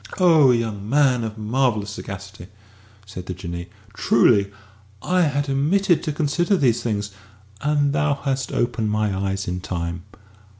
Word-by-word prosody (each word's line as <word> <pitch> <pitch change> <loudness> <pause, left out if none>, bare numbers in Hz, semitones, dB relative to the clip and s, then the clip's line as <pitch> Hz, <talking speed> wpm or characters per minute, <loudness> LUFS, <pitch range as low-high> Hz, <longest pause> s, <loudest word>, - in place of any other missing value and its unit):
"O 160 -7 +6
young 110 -4 -1
man 135 -3 +3
of 110 0 -5
marvellous 110 -2 0
sagacity!" 100 -2 -8 0.6
said 95 -3 -9
the 90 - -4
Jinnee; 85 0 -7 0.2
"truly 105 -3 +3 0.5
I 180 0 +2
had 145 -3 0
omitted 165 +7 +2
to 155 - -2
consider 170 +6 +1
these 120 -7 +2
things, 105 -3 -2 0.5
and 145 -1 +1
thou 145 0 +1
hast 135 -1 -3
opened 120 -3 -1
my 105 -2 0
eyes 95 0 -2
in 90 +1 -2
time. 85 -1 -4
115 Hz, 140 wpm, -22 LUFS, 100-145 Hz, 0.6 s, O